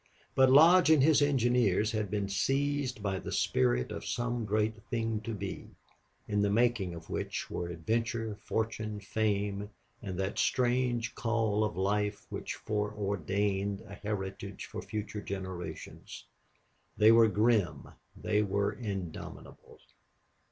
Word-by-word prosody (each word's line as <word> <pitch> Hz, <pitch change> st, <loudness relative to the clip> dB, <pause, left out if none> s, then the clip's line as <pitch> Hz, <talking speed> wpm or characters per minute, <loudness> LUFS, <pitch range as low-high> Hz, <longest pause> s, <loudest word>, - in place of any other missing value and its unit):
But 130 Hz, -1 st, +5 dB
Lodge 165 Hz, +6 st, +7 dB
and 155 Hz, -4 st, +6 dB
his 150 Hz, -1 st, +5 dB
engineers 120 Hz, -7 st, +3 dB
had 105 Hz, -3 st, -2 dB
been 100 Hz, 0 st, -1 dB
seized 135 Hz, +3 st, 0 dB
by 95 Hz, -2 st, -1 dB
the -, -, -6 dB
spirit 60 Hz, -1 st, +1 dB
of -, -, -5 dB
some 120 Hz, -1 st, -2 dB
great 110 Hz, +1 st, 0 dB
thing 115 Hz, -3 st, -1 dB
to 115 Hz, -, -5 dB
be, 100 Hz, -, -6 dB, 0.6 s
in 105 Hz, -1 st, +1 dB
the 100 Hz, -, +2 dB
making 110 Hz, -5 st, +1 dB
of 80 Hz, -1 st, -10 dB
which -, -, -3 dB
were 85 Hz, -, -3 dB
adventure, 110 Hz, +5 st, -2 dB
fortune, 110 Hz, -1 st, -2 dB
fame, 100 Hz, -1 st, -1 dB, 0.3 s
and 95 Hz, -4 st, -5 dB
that 95 Hz, +1 st, -2 dB
strange 120 Hz, -2 st, +1 dB
call 110 Hz, -2 st, 0 dB
of 105 Hz, -2 st, -2 dB
life 105 Hz, +2 st, 0 dB
which -, -, -4 dB
foreordained 100 Hz, -1 st, -1 dB
a 105 Hz, -2 st, -12 dB
heritage 100 Hz, -1 st, -5 dB
for -, -, -6 dB
future 105 Hz, -1 st, -5 dB
generations. 95 Hz, -3 st, -7 dB, 0.7 s
They 110 Hz, +1 st, +7 dB
were 115 Hz, 0 st, +7 dB
grim; 110 Hz, -2 st, +1 dB, 0.3 s
they 105 Hz, -1 st, +1 dB
were 100 Hz, 0 st, 0 dB
indomitable. 100 Hz, -8 st, -7 dB
105 Hz, 130 wpm, -31 LUFS, 100-115 Hz, 0.7 s, Lodge